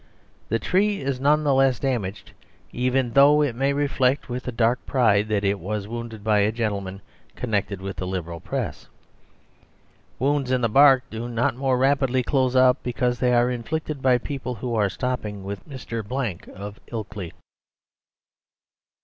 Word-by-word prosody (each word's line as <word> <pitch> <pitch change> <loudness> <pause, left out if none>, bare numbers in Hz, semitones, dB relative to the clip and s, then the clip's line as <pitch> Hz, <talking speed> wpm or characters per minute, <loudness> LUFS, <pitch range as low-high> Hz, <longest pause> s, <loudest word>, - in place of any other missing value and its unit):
The 115 - +2
tree 200 - +1
is 135 -2 -2
none 150 +3 +3
the 145 -2 +3
less 135 -1 +3
damaged 110 -8 -3 0.4
even 125 0 0
though 145 +2 +6
it 140 -5 0
may 135 +4 +1
reflect 140 -2 +1
with 125 +1 -5
a - - -1
dark 120 +1 +1
pride 110 -5 +3
that 105 -2 0
it 100 0 +1
was 100 +2 -4
wounded 115 -2 -7
by 105 -1 +3
a 105 +1 +2
gentleman 100 -4 -3 0.3
connected 100 -5 -2
with 95 -1 -5
the 90 +1 -4
Liberal 85 -3 -4
press. - - -4 1.3
Wounds 140 0 0
in 130 -1 +1
the 115 - +1
bark 135 +1 +6
do 115 +2 -5
not 120 0 0
more 130 0 +1
rapidly 135 -1 +2
close 130 -1 +1
up 130 0 +5
because 125 0 -1
they 125 0 +2
are 120 +1 +3
inflicted 150 +4 -4
by 130 -1 +4
people 130 -1 -5
who 120 +2 -4
are 105 -3 +2
stopping 105 -3 -4
with 100 +6 -7
Mr. 115 -4 -5
Blank 115 -5 -4
of 100 +2 -9
Ilkley. 105 -6 -6
125 Hz, 165 wpm, -24 LUFS, 105-135 Hz, 1.3 s, though